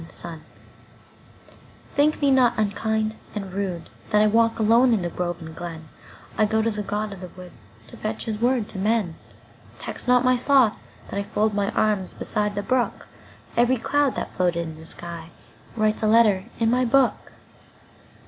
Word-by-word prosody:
The 165 - -11
Apology 160 -2 -8 1.5
THINK 300 +2 +2
me 280 - +4
not 245 -3 +4
unkind 220 +1 -1 0.2
and 195 -3 -5
rudeThat 190 -3 -3 0.4
I - - +5
walk 225 +1 +3
alone 230 +3 +4
in 180 -5 -1
grove 175 0 -3
and 160 -1 -9
glen;I 165 +5 -5
go 220 +1 +1
to 230 - +1
the 210 -1 -3
god 210 +1 -3
of 190 - -11
the 180 - -6
woodTo 110 - -15
fetch 215 +1 -3
his 220 -1 -4
word 245 -3 +2
to 195 - -7
men. 210 -3 +1 0.6
Tax - - -7
not 250 0 +4
my 255 0 +5
sloth 255 -3 +3 0.3
that 200 - -2
IFold 210 +1 0
my 200 0 0
arms 210 -4 0
beside 210 -1 -2
the 205 - -2
brook; 250 -3 0 0.5
Each 240 0 +2
cloud 290 -2 +2
that - - -4
floated 175 -2 +1
in 160 - -8
the 160 - -12
skyWrites 170 +6 -5
a 215 - +2
letter 215 -4 +4
in 225 -1 +2
my 250 +1 +2
book. 255 +1 +2
215 Hz, 165 wpm, -24 LUFS, 185-230 Hz, 1.5 s, I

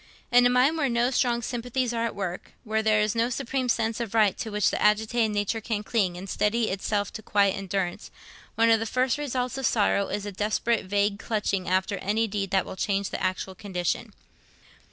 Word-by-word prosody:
In 245 0 +6
a - - +2
mind 255 +6 +3
where 280 -3 +1
no 240 +1 +1
strong 240 -2 +1
sympathies 245 +1 -2
are 230 0 0
at 230 - -3
work, 185 -3 -5
where 220 -1 0
there 215 -1 +3
is 210 -1 +1
no 230 +1 +1
supreme 255 0 -2
sense 225 -1 0
of 230 -2 -4
right 210 -4 +4
to 225 - -3
which 210 -1 +1
the - - -2
agitated 220 +2 +2
nature 210 +2 -1
can 215 -2 -2
cling 195 -6 0
and 190 +2 -7
steady 220 +4 0
itself 200 +1 -2
to 220 - -6
quiet 200 -2 +2
endurance, 195 -2 -3 0.5
one 230 0 +4
of 225 - +5
the 225 - -3
first 255 +3 +1
results 255 -2 -2
of 265 - -2
sorrow 200 -2 +2
is 205 0 -3
a 205 - -4
desperate 215 +3 0
vague 200 +1 0
clutching 200 -5 -1
after 190 +2 0
any 210 +4 0
deed 200 -2 -3
that 190 -1 +1
will - - -7
change 200 0 -1
the - - -4
actual 185 0 -2
condition. 180 -3 -3
215 Hz, 210 wpm, -26 LUFS, 200-235 Hz, 0.5 s, In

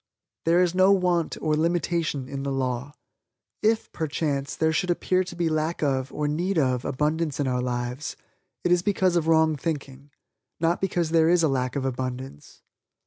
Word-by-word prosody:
There 170 +2 +4
is 175 -1 0
no 185 +1 +5
want 180 -4 +1
or 155 -1 +2
limitation 165 -4 0
in 135 0 -5
the 140 0 -2
law. 130 +1 -2 0.7
If, 220 +1 +1
perchance, 145 -3 -2
there 160 0 +1
should 180 +3 0
appear 185 +1 +1
to 180 -1 -9
be 170 -1 0
lack 155 +1 -1
of, 135 -2 0
or 150 -1 -2
need 175 +5 -1
of, 130 -4 +1
abundance 150 +2 -1
in 140 - +1
our 125 -1 0
lives, 125 +3 -3 0.5
it 175 - +1
is 175 -1 +4
because 185 -2 +1
of 165 -2 +1
wrong 160 -1 +4
thinking 140 -2 -5 0.5
not 165 +1 +1
because 175 -4 0
there 165 -1 +4
is 175 -1 +4
a - - +5
lack 130 -2 -1
of 135 -2 -1
abundance. 130 - -5
155 Hz, 180 wpm, -25 LUFS, 135-175 Hz, 0.7 s, no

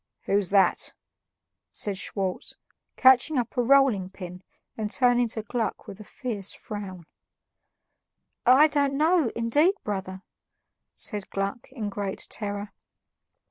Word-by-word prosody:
"Who's 200 -2 +1
that?" 195 -3 +3 0.8
said 205 -2 -1
Schwartz, 190 -1 -3 0.4
catching 260 +3 +5
up 240 0 -2
a 250 - +2
rolling 245 -7 +4
pin 180 -1 -9 0.3
and 215 -2 -3
turning 245 0 +3
to 220 -1 -5
Gluck 230 +1 -3
with 195 - -10
a - - -8
fierce 210 -4 -3
frown. 190 -5 -7 1.4
"I 260 +5 +7
don't 285 -2 +1
know, 315 -3 +3
indeed, 290 - +3
brother," 190 -2 -4 0.7
said 205 -2 -3
Gluck 200 +6 -4
in 225 -6 -4
great 200 -1 -4
terror. 205 -1 -4
215 Hz, 120 wpm, -26 LUFS, 195-255 Hz, 1.4 s, I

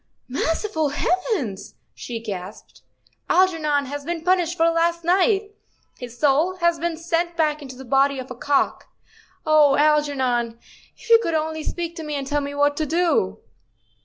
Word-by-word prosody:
"Merciful 320 +4 -1
heavens! 300 - -2
" - - -48
she 235 -2 -6
gasped, 200 -2 -8 0.5
"Algernon 315 -6 +2
has 285 +2 -6
been 330 +1 -4
punished 355 -1 +1
for 330 0 +4
last 335 +1 +1
night. 390 +4 +2 0.5
His 245 -1 -9
soul 305 +7 +2
has 340 -2 +1
been 335 0 -2
sent 340 +1 -2
back 305 -2 +1
into 265 -2 -9
the 265 +1 -10
body 275 +2 +2
of 260 0 -7
a - - -6
cock. 280 +3 0 0.6
Oh, 305 -3 +5
Algernon, 265 -6 +1 0.4
if - - -15
you 460 - +9
could 335 -7 -1
only 315 0 -2
speak 340 0 -4
to 325 - -5
me 300 -1 -4
and 275 -1 -3
tell 290 +1 -1
me 285 0 -5
what 290 0 +2
to 310 - -1
do." 320 - +1
305 Hz, 165 wpm, -22 LUFS, 275-340 Hz, 0.6 s, you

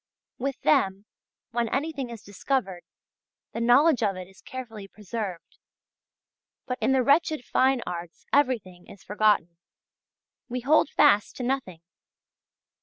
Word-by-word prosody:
With 275 +1 -3
them, 190 +5 +2 0.5
when 235 -1 -1
anything 280 -2 -2
is 230 -3 -9
discovered, 200 -2 -2 0.7
the 230 - -4
knowledge 250 +4 +4
of 200 -3 +1
it 185 -1 -8
is 190 0 -19
carefully 225 -6 -8
preserved. 205 -3 -7 1.1
But 250 -1 -4
in - - +2
the 265 -1 +3
wretched 300 0 +2
fine 260 -2 +2
arts 175 -1 -7
everything 225 -11 0
is 195 - -14
forgotten; 205 -5 +1 0.9
we 250 +1 -3
hold 290 +3 +3
fast 205 +1 +3
to 255 - -5
nothing. 245 -10 -3
230 Hz, 125 wpm, -26 LUFS, 195-265 Hz, 1.1 s, knowledge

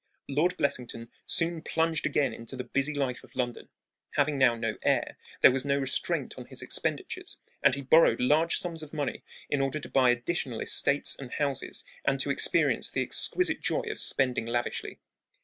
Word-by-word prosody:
Lord 155 +6 +1
Blessington 120 -4 -2 0.2
soon 165 -1 +2
plunged 160 0 0
again 140 -3 +1
into 115 +3 -7
the 125 - -4
busy 140 +3 -1
life 135 -3 -2
of - - -18
London. 120 -2 -3 0.5
Having 145 0 +1
now 125 -3 +5
no 115 -2 -3
heir, - - +1 0.3
there - - +9
was 130 0 0
no 140 0 +1
restraint 135 -2 -2
on - - -9
his - - -6
expenditures, - - -3 0.2
and 140 -1 +4
he 140 - -6
borrowed 160 +5 +5
large 155 +6 +3
sums 170 -3 -3
of 155 0 -9
money 145 -2 -2 0.3
in 145 - 0
order 135 +2 -1
to 150 - -8
buy 130 -2 +4
additional 120 0 -1
estates 140 +1 +1
and 130 -3 -9
houses 140 -3 -2 0.2
and - - +1
to - - 0
experience - - +3
the - - -1
exquisite 360 - 0
joy - - 0
of 435 - +1
spending 125 -4 +1
lavishly. 120 +1 -2
140 Hz, 180 wpm, -28 LUFS, 125-155 Hz, 0.5 s, there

